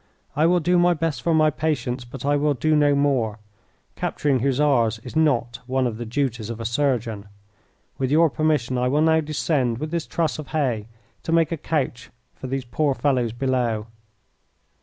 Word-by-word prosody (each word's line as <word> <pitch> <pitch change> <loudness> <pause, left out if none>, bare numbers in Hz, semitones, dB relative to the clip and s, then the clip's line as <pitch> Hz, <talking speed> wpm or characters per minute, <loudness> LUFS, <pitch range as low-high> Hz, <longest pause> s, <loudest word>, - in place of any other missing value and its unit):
I 155 +2 +3
will 180 +1 +3
do 175 +2 +2
my 175 0 +4
best 155 -6 -2
for 170 - 0
my 155 -1 +4
patients, 130 -5 -2
but 130 +2 -8
I 145 0 +2
will 145 0 +1
do 155 +5 +1
no 145 -1 +4
more. 130 -7 +1 0.6
Capturing 140 -3 0
Hussars 130 -4 +2
is - - -8
not 125 -7 +1
one 130 0 +1
of 115 -3 -2
the 120 0 -6
duties 120 -3 -2
of 115 -1 -5
a 115 - -5
surgeon. 115 -4 -1 0.7
With 130 -1 0
your 160 +2 +4
permission 140 -6 0
I 125 - +1
will 145 +4 +2
now 160 0 +4
descend 145 -5 0
with 155 +4 -5
this 170 -2 -2
truss 160 -2 -1
of 150 - -7
hay 125 -9 -1 0.3
to - - -4
make 165 -1 +3
a - - 0
couch 140 -6 -3 0.2
for 130 - -8
these 135 0 -3
poor 140 +3 0
fellows 130 -6 +1
below." 120 -3 -1
135 Hz, 185 wpm, -23 LUFS, 120-155 Hz, 0.7 s, my